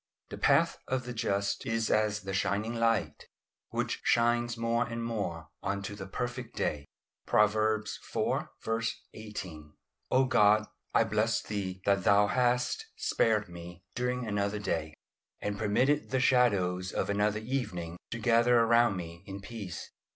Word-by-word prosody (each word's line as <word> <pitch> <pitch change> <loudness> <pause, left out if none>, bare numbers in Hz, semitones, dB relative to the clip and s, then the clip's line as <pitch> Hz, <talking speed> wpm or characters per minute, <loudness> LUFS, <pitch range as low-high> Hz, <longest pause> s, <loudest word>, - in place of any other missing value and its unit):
"The - - -5
path - - +3
of 130 -1 -1
the 125 - -5
just 100 -3 -1
is 115 -1 0
as 105 -1 +2
the 95 0 -5
shining 105 +4 0
light, 115 -2 0 0.4
which - - -2
shines 120 0 +2
more 115 +1 +1
and 115 -1 -4
more 90 -9 -3
onto 100 +1 -3
the 100 -1 -7
perfect 120 +4 -4
day." 70 -1 -2 0.4
Proverbs 110 0 +2
iv. 115 0 -1 0.2
18. 90 -9 -8 0.4
O 130 +1 +4
God, 110 -4 +4 0.3
I - - +6
bless 110 +1 +1
Thee 95 -3 -4
that 100 -2 +3
Thou 100 +2 +5
hast 125 - +1
spared 105 -2 +1
me 85 0 -10
during 125 0 -1
another 100 -1 -1
day, 80 -6 -2 0.4
and 105 0 -3
permitted 130 +8 +2
the 130 - +1
shadows 100 -8 +2
of - - -1
another 105 +1 +1
evening 105 -9 -3
to 120 - -4
gather 120 +1 +4
around 115 -3 +4
me 85 -1 -7
in 100 0 -6
peace. 100 -5 -7
105 Hz, 145 wpm, -30 LUFS, 100-120 Hz, 0.4 s, I